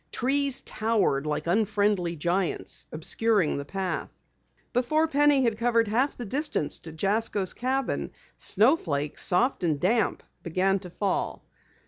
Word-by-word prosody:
Trees 275 Hz, +2 st, +2 dB
towered 205 Hz, -10 st, 0 dB
like 150 Hz, -, -2 dB
unfriendly 200 Hz, -2 st, +1 dB
giants, 175 Hz, +3 st, -2 dB
obscuring 195 Hz, +2 st, +1 dB
the 140 Hz, -, -5 dB
path. 190 Hz, +3 st, -3 dB, 0.6 s
Before 305 Hz, +6 st, +2 dB
Penny 290 Hz, -2 st, +4 dB
had 230 Hz, -3 st, 0 dB
covered 230 Hz, -1 st, +2 dB
half 250 Hz, +7 st, +1 dB
the 245 Hz, -, -5 dB
distance 270 Hz, -, -1 dB
to 160 Hz, -, -9 dB
Jasko's 200 Hz, +3 st, 0 dB
cabin, 260 Hz, +1 st, -2 dB, 0.3 s
snowflakes, 165 Hz, -, +1 dB
soft 215 Hz, +4 st, +2 dB
and 155 Hz, -4 st, +1 dB
damp, 215 Hz, +5 st, +1 dB, 0.2 s
began 190 Hz, +3 st, +1 dB
to 180 Hz, -1 st, -10 dB
fall. 195 Hz, +2 st, -2 dB
210 Hz, 125 wpm, -26 LUFS, 175-245 Hz, 0.6 s, Penny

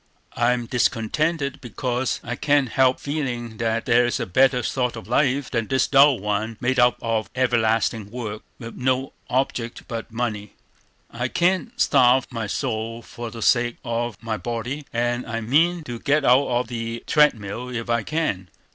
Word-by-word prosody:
I 120 Hz, +1 st, +3 dB
am 120 Hz, -1 st, -3 dB
discontented, 140 Hz, +5 st, 0 dB
because 125 Hz, +1 st, -2 dB
I 125 Hz, +1 st, -4 dB
can't 145 Hz, -1 st, +2 dB
help 130 Hz, +1 st, +3 dB
feeling 125 Hz, -6 st, -4 dB
that 115 Hz, -1 st, -1 dB
there 120 Hz, +1 st, +4 dB
is 120 Hz, -, -1 dB
a -, -, -1 dB
better 130 Hz, +5 st, +3 dB
sort 125 Hz, -1 st, -1 dB
of 115 Hz, -, -9 dB
life 135 Hz, +2 st, +1 dB
than 115 Hz, -3 st, -1 dB
this 130 Hz, -1 st, +2 dB
dull 140 Hz, -1 st, +5 dB
one 105 Hz, +2 st, -2 dB
made 130 Hz, +1 st, 0 dB
up 120 Hz, -3 st, +4 dB
of 115 Hz, -2 st, -1 dB
everlasting 115 Hz, -3 st, +1 dB
work, 110 Hz, -2 st, -5 dB, 0.2 s
with 115 Hz, -2 st, -8 dB
no 130 Hz, +1 st, -1 dB, 0.2 s
object 125 Hz, -2 st, -1 dB
but 115 Hz, 0 st, -6 dB
money. 110 Hz, -3 st, -3 dB, 0.6 s
I 120 Hz, +2 st, -2 dB
can't 190 Hz, -, 0 dB
starve 130 Hz, -2 st, +4 dB
my 115 Hz, -3 st, -3 dB
soul 115 Hz, 0 st, -3 dB
for 120 Hz, +1 st, -7 dB
the 115 Hz, -1 st, -6 dB
sake 120 Hz, -1 st, +2 dB
of 120 Hz, -1 st, -2 dB
my 110 Hz, -1 st, -2 dB
body, 120 Hz, +6 st, -4 dB
and 120 Hz, +1 st, 0 dB
I 115 Hz, 0 st, -3 dB
mean 160 Hz, +9 st, +2 dB
to 120 Hz, -5 st, -6 dB
get 145 Hz, +3 st, +1 dB
out 130 Hz, +3 st, +5 dB
of 120 Hz, -1 st, 0 dB
the 115 Hz, -1 st, -5 dB
treadmill 125 Hz, -5 st, +2 dB
if 115 Hz, -2 st, -4 dB
I 120 Hz, -1 st, +1 dB
can. 105 Hz, -, -2 dB
120 Hz, 170 wpm, -23 LUFS, 115-130 Hz, 0.6 s, dull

